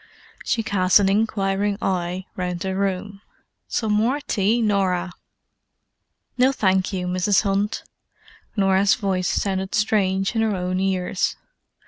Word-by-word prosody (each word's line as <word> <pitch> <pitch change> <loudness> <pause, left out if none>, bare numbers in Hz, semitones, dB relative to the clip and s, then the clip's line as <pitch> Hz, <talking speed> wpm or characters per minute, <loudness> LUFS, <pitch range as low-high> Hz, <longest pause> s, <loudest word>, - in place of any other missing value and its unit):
She 225 - 0
cast 190 -3 +3
an 195 -1 +2
inquiring 200 -1 0
eye 180 -1 -2
round 180 -1 -3
the 190 +1 -2
room: 195 +1 -2 0.5
"Some 220 -2 -1
more 235 +7 +1
tea, 220 -4 0
Norah?" 190 -5 0 1.3
"No, 255 +2 +5
thank 190 -6 +1
you, 185 -2 -3
Mrs. 185 +3 +2
Hunt." 200 +1 -1 0.7
Norah's 195 -1 +3
voice 190 -5 -1
sounded 190 +1 -1
strange 195 -2 +1
in 225 - +2
her 220 -2 +1
own 185 0 -2
ears. 190 -1 -1
195 Hz, 125 wpm, -22 LUFS, 185-210 Hz, 1.3 s, No